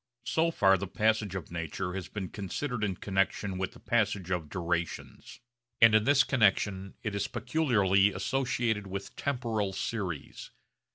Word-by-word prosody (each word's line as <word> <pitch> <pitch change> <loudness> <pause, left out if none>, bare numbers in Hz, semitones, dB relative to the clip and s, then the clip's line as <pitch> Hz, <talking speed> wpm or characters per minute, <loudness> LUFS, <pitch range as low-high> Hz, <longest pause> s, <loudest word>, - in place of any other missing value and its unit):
So 160 +6 +2
far 95 - +4
the 100 - -3
passage 110 -1 +1
of 90 -4 -6
nature 85 +2 -4
has 95 -1 -5
been 95 -4 -5
considered 110 +4 -4
in 100 -3 0
connexion 95 0 -1
with 95 - -2
the - - -14
passage 105 -5 0
of 85 -4 -2
durations; 85 0 -4 0.4
and 115 -1 +7
in 110 0 +4
this 140 0 +5
connexion 100 -6 +1
it 110 - -2
is 100 0 -1
peculiarly 115 -7 +2
associated 110 0 -1
with 95 +1 -6
temporal 115 -7 -1
series. 95 -7 -4
100 Hz, 150 wpm, -30 LUFS, 95-115 Hz, 0.4 s, and